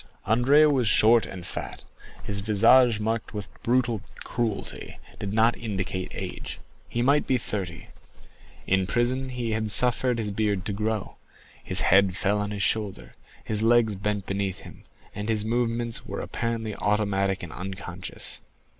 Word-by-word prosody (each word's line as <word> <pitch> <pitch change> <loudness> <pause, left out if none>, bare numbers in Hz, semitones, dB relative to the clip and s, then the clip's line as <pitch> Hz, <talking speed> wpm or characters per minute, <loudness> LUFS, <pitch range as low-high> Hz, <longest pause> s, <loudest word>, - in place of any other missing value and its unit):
Andrea 135 +7 +5
was 135 -6 +2
short 110 +3 +5
and 90 -3 -8
fat; - - -6 0.4
his 100 -1 -3
visage, 115 +3 +5
marked 110 0 -2
with 105 -1 -4
brutal 120 -3 +1 0.2
cruelty, 115 -4 -3 0.2
did 100 - -4
not 115 +2 +3
indicate 95 -4 -4
age; - - -6 0.3
he 120 - -1
might 140 +3 +3
be 130 - +3
thirty. 95 -7 -5 0.8
In 95 -1 +2
prison 130 +4 0
he 120 -2 -3
had 110 0 -1
suffered 125 +2 +4
his 105 -3 -2
beard 100 -2 -1
to 105 - -2
grow; 105 0 -2 0.5
his - - 0
head 95 0 +4
fell 105 +1 +1
on 105 0 -2
his 100 -1 -2
shoulder, 95 - -1 0.3
his 110 -1 0
legs 115 -1 +4
bent 100 0 -2
beneath 95 0 -2
him, - - -13 0.3
and 105 +2 -5
his 110 -1 0
movements 115 0 0
were - - -6
apparently 115 -2 -3
automatic 100 -1 0
and 85 - -7
unconscious. 95 -1 -6
110 Hz, 150 wpm, -26 LUFS, 100-115 Hz, 0.8 s, Andrea